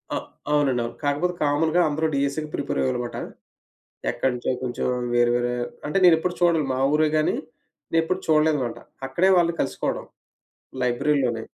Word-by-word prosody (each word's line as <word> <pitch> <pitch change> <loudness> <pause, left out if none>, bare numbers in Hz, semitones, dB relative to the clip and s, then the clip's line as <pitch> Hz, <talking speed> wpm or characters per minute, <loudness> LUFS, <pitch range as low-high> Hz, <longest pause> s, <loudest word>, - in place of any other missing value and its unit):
అ - - +1 0.3
అవునండి, 140 -5 +2
అవును. 115 - -5
కాకపోతే 145 +5 0
కామన్‌గా 155 +4 +2
అందరూ 155 +2 0
డీఎస్సీ‌కి 140 +2 -1
ప్రిపేర్ 145 - -2
అయ్యేవాళ్ళనమాట. 125 -2 -2 0.9
ఎక్కడినుంచో 125 -1 -1
కొంచెం 125 -1 -2 0.3
వేరే 120 0 +4
వేరే 120 0 0 0.3
అంటే 150 - 0
నేనెప్పుడు 175 0 +5
చూడను. 170 -2 +3
మా - - -2 0.2
ఊరే 155 +1 +4
గాని, 155 - +2 0.6
నేను 165 - +4
ఎప్పుడు 185 +3 -1
చూడలేదనమాట. 155 -6 +2 0.3
అక్కడే 170 +8 +2
వాళ్ళని 170 -1 +2
కలుసుకోవడం, - - -2 0.8
లైబ్రరీలోనే. 125 -1 +1
145 Hz, 135 wpm, -24 LUFS, 125-160 Hz, 0.9 s, నేనెప్పుడు